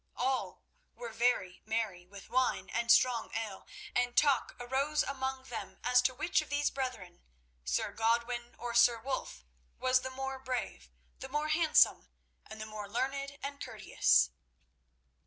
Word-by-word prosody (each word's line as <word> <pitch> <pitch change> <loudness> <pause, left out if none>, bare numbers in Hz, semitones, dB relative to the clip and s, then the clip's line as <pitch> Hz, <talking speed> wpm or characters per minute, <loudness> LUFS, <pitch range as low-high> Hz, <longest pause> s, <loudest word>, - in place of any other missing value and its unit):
All 260 +1 -1 0.3
were 235 -1 -7
very 225 -6 +1
merry 215 -5 -2
with 200 +1 -13
wine 255 0 +1
and 235 0 -1
strong 240 -2 +4
ale, 220 -4 -5 0.3
and 245 0 +1
talk 285 -3 +3
arose 275 +5 0
among 265 -1 -3
them 245 -3 -7
as 250 0 +5
to 255 0 +1
which 310 +4 +1
of 310 - -10
these 290 0 +1
brethren—Sir 65 - -5
Godwin 235 +1 0
or 235 +1 -5
Sir 235 0 +5
Wulf—was 65 - -2
the 260 - -4
more 265 0 -5
brave, 255 -1 -4 0.3
the 265 - -7
more 300 +2 -1
handsome, 315 0 +4 0.4
and 220 - -10
the 215 - -4
more 215 -2 -7
learned 275 +4 -2
and 280 0 -5
courteous. - - +2
245 Hz, 140 wpm, -32 LUFS, 215-265 Hz, 0.4 s, as